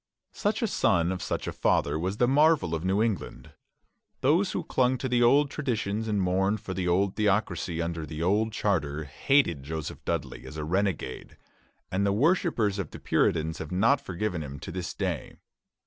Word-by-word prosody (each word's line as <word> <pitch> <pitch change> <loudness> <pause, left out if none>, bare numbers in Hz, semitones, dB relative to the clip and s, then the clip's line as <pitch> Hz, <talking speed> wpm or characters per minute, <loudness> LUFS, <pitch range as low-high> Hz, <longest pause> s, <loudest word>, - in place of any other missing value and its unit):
Such 210 +2 -1
a - - +2
son 85 - +2
of 95 -1 -4
such - - -3
a - - -3
father 80 - +1
was 95 +4 -2
the 120 - +3
marvel 145 - +3
of 80 0 -2
New 95 +3 +2
England. 95 - -3 0.7
Those 170 +8 +3
who - - -2
clung 130 0 +1
to 130 - -3
the 120 -1 +2
old 140 +4 +4
traditions 110 -6 -2
and 105 -2 0
mourned 95 +3 +1
for 95 - -6
the 95 -1 -2
old 95 +2 +2
theocracy 95 -5 0
under 85 -2 -4
the 80 +2 -4
old 105 +5 +2
charter, 80 -9 -1
hated 85 - +1
Joseph 80 +2 -6
Dudley 70 -6 -3
as 75 - -9
a 75 - -3
renegade; 90 -6 -2 0.5
and 95 +2 0
the 100 - +2
worshippers 120 - +2
of 100 - -3
the - - -9
Puritans 80 -1 +1
have 80 - -6
not 115 +10 +3
forgiven 90 - -3
him 70 -2 -7
to - - -6
this 90 0 -5
day. - - -3
95 Hz, 185 wpm, -27 LUFS, 85-120 Hz, 0.7 s, old